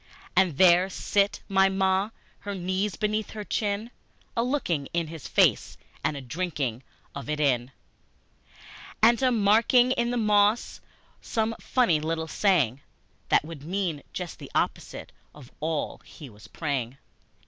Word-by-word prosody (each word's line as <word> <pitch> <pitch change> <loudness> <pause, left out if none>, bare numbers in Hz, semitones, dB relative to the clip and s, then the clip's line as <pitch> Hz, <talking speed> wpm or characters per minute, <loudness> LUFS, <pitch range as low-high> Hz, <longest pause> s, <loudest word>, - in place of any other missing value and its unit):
And 180 -7 +3
there 180 +1 +6
sit 200 +1 0
my 195 0 +4
Ma, 190 +1 +1 0.3
her 200 0 -5
knees 190 +2 -1
beneath 215 0 -1
her 215 -1 -5
chin, 210 +2 -2 0.4
A 230 - +2
looking 210 - -1
in 170 -2 -1
his 160 -3 -8
face - - +2 0.3
and 145 - 0
a - - -6
drinking 135 -4 -3 0.3
of 140 +1 -7
it 150 0 -1
in, 125 -4 +1 1.3
And 235 +2 +6
a 260 -1 +3
marking 230 +3 +4
in 240 -2 +1
the 245 - -1
moss 210 0 +2 0.4
some 225 -1 -1
funny 210 -12 +2
little 160 +1 -2
saying 150 - +1 0.5
That - - +3
would 160 -3 -9
mean 175 -3 -2
just 180 -2 -6
the - - -9
opposite - - -2 0.2
of 135 -4 -14
all 155 -1 -3
he 145 -6 -12
was 105 +1 -15
praying! 135 -5 -3
185 Hz, 145 wpm, -26 LUFS, 150-210 Hz, 1.3 s, there